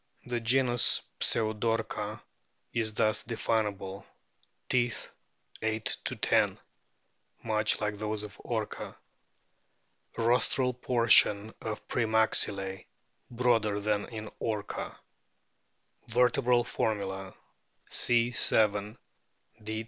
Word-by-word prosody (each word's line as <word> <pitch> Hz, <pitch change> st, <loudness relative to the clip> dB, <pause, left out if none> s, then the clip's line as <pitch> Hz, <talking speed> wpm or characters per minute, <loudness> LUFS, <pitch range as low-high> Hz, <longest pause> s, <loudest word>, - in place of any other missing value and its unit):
The 120 Hz, -1 st, -2 dB
genus 120 Hz, +1 st, +2 dB, 0.2 s
PSEUDORCA 110 Hz, 0 st, 0 dB, 0.5 s
is 110 Hz, -2 st, 0 dB
thus 110 Hz, 0 st, +2 dB
definable: 105 Hz, -4 st, -2 dB, 0.6 s
Teeth, 120 Hz, -2 st, -1 dB, 0.5 s
8 110 Hz, 0 st, -2 dB
10, -, -, +1 dB, 0.9 s
much 110 Hz, -1 st, +1 dB
like 105 Hz, -1 st, -3 dB
those 105 Hz, 0 st, -3 dB
of 105 Hz, -1 st, -10 dB
Orca. 110 Hz, -3 st, -4 dB, 1.2 s
Rostral 125 Hz, +2 st, +2 dB
portion 115 Hz, -3 st, +4 dB
of 110 Hz, -1 st, -6 dB
pre 120 Hz, -, 0 dB
maxillse 100 Hz, -3 st, +3 dB, 0.5 s
broader 115 Hz, -4 st, +1 dB
than 105 Hz, 0 st, -1 dB
in 110 Hz, -2 st, -7 dB
Orca. 105 Hz, -2 st, -4 dB, 1.1 s
Vertebral 120 Hz, +1 st, +3 dB
formula: 95 Hz, -5 st, -3 dB, 0.5 s
C. 120 Hz, 0 st, +2 dB
7; 105 Hz, -1 st, +2 dB, 0.7 s
D. 110 Hz, +1 st, -4 dB
110 Hz, 85 wpm, -29 LUFS, 105-120 Hz, 1.2 s, portion